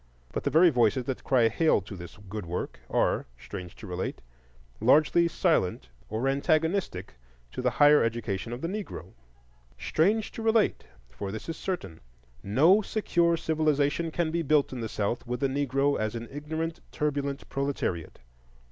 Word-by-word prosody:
But -, -, -2 dB
the -, -, +3 dB
very 170 Hz, +2 st, +6 dB
voices 125 Hz, 0 st, +2 dB
that 130 Hz, -1 st, -4 dB
cry 125 Hz, -4 st, +4 dB
hail 155 Hz, +6 st, +3 dB
to 100 Hz, +2 st, -9 dB
this 85 Hz, +1 st, -10 dB
good 105 Hz, -2 st, -6 dB
work 90 Hz, +2 st, -4 dB
are, -, -, +1 dB
strange 90 Hz, +7 st, -8 dB
to -, -, -11 dB
relate, 90 Hz, -1 st, -4 dB, 0.6 s
largely 155 Hz, +3 st, +4 dB
silent 155 Hz, -, 0 dB, 0.2 s
or 110 Hz, +5 st, -1 dB
antagonistic 155 Hz, -, 0 dB, 0.4 s
to -, -, -4 dB
the 125 Hz, -, +2 dB
higher 145 Hz, +5 st, +6 dB
education 115 Hz, -2 st, -2 dB
of 120 Hz, +2 st, -5 dB
the 165 Hz, -, -1 dB
Negro. 185 Hz, -, -6 dB, 0.6 s
Strange 205 Hz, +7 st, +1 dB
to -, -, -7 dB
relate! 225 Hz, -1 st, +2 dB, 0.3 s
for 95 Hz, +10 st, -5 dB
this 110 Hz, -, -7 dB
is 165 Hz, -, -4 dB
certain, 180 Hz, -, -4 dB, 0.4 s
no 160 Hz, -, +4 dB
secure 170 Hz, -6 st, +1 dB
civilization 155 Hz, 0 st, +1 dB
can 160 Hz, 0 st, -1 dB
be 170 Hz, +1 st, 0 dB
built 150 Hz, -3 st, +2 dB
in 125 Hz, -, -5 dB
the 110 Hz, -, -3 dB
South 110 Hz, +5 st, -2 dB
with 125 Hz, 0 st, -2 dB
the 135 Hz, -, +3 dB
Negro 140 Hz, +1 st, +1 dB
as 110 Hz, +1 st, -2 dB
an 115 Hz, 0 st, -5 dB
ignorant, 160 Hz, +3 st, -4 dB
turbulent 140 Hz, -2 st, -2 dB
proletariat. 135 Hz, -, -2 dB
140 Hz, 160 wpm, -28 LUFS, 110-165 Hz, 0.6 s, very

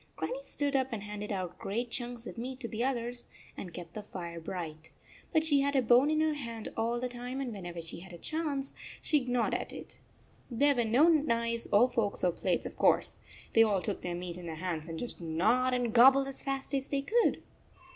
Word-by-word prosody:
Grannie -, -, -3 dB
stood 290 Hz, -, -2 dB
up 260 Hz, -1 st, +3 dB
and 215 Hz, -3 st, -4 dB
handed 210 Hz, 0 st, -5 dB
out 185 Hz, -3 st, -3 dB
great 230 Hz, +4 st, -2 dB
chunks 240 Hz, -1 st, -5 dB
of -, -, -7 dB
meat 255 Hz, +2 st, -5 dB
to 240 Hz, -, -4 dB
the 230 Hz, +1 st, -2 dB
others 245 Hz, -2 st, -2 dB, 0.3 s
and 180 Hz, -, -7 dB
kept 170 Hz, -1 st, -8 dB
the 215 Hz, -, -5 dB
fire 170 Hz, -4 st, -7 dB
bright. 160 Hz, -2 st, -6 dB, 0.4 s
But 315 Hz, -3 st, +3 dB
she 290 Hz, -3 st, +4 dB
had 280 Hz, 0 st, +1 dB
a 265 Hz, -, +5 dB
bone 245 Hz, +5 st, +5 dB
in 310 Hz, 0 st, +2 dB
her 315 Hz, -1 st, +2 dB
hand 230 Hz, -6 st, -5 dB
all 230 Hz, +2 st, 0 dB
the 250 Hz, -, -1 dB
time, 245 Hz, +2 st, -5 dB
and 255 Hz, -4 st, -3 dB
whenever 175 Hz, -4 st, -6 dB
she 165 Hz, +1 st, -6 dB
had 190 Hz, +2 st, -12 dB
a 175 Hz, -, -9 dB
chance, 290 Hz, -, -2 dB, 0.3 s
she 295 Hz, -4 st, +2 dB
gnawed 245 Hz, -1 st, +1 dB
it. -, -, -5 dB, 0.5 s
There 280 Hz, +4 st, +4 dB
were 240 Hz, -3 st, +1 dB
no 250 Hz, +9 st, +5 dB
knives 235 Hz, -8 st, +2 dB
or 220 Hz, +5 st, +6 dB
forks 230 Hz, -5 st, -1 dB
or 180 Hz, -, +4 dB
plates, -, -, -1 dB
of -, -, -7 dB
course. -, -, +3 dB, 0.3 s
They 225 Hz, -, +7 dB
all 210 Hz, -4 st, +4 dB
took 205 Hz, -, -1 dB
their 175 Hz, -1 st, -3 dB
meat 175 Hz, 0 st, -5 dB
in 175 Hz, -, -8 dB
their 160 Hz, -, -4 dB
hands 165 Hz, -2 st, -3 dB
and 165 Hz, -1 st, -5 dB
just 240 Hz, -1 st, -5 dB
gnawed 235 Hz, +11 st, +2 dB
and 240 Hz, -3 st, 0 dB
gobbled 270 Hz, +3 st, +7 dB
as 275 Hz, -, -5 dB
fast 275 Hz, 0 st, -3 dB
as 270 Hz, -1 st, -1 dB
they 275 Hz, -1 st, 0 dB
could 465 Hz, +9 st, +2 dB
235 Hz, 220 wpm, -31 LUFS, 190-270 Hz, 0.5 s, They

